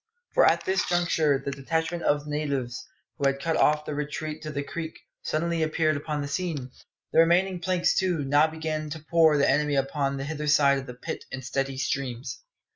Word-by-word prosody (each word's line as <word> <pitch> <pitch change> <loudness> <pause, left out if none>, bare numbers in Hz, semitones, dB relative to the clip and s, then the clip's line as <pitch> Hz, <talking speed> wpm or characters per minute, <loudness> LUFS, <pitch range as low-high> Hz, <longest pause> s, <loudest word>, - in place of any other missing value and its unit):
For - - +6
at - - +2
this 190 0 +1
juncture 165 -5 +2
the 135 +1 -4
detachment 160 +5 -2
of 145 -2 +1
natives 140 -5 -3 0.3
who 140 - +3
had 135 0 0
cut 165 +3 -1
off 150 0 +3
the - - -4
retreat 150 +1 -4
to 155 - -6
the 140 -1 -3
creek 160 +2 -6 0.2
suddenly 165 +1 -1
appeared 155 0 +1
upon 150 0 -3
the - - -4
scene. 140 -4 -3 0.4
The - - +5
remaining 175 +3 +4
planks, 180 0 +1
too, 180 -6 +1
now 145 +3 +4
began 155 -1 -4
to 160 +2 -5
pour 160 -3 +5
the 140 - +3
enemy 145 +1 +2
upon 140 0 0
the 135 - -3
hither 150 +1 -4
side 140 -2 +4
of 135 - -9
the 125 - -8
pit 125 - -6
in 130 - -6
steady 135 +1 -2
streams. 130 - -3
150 Hz, 200 wpm, -26 LUFS, 140-160 Hz, 0.4 s, For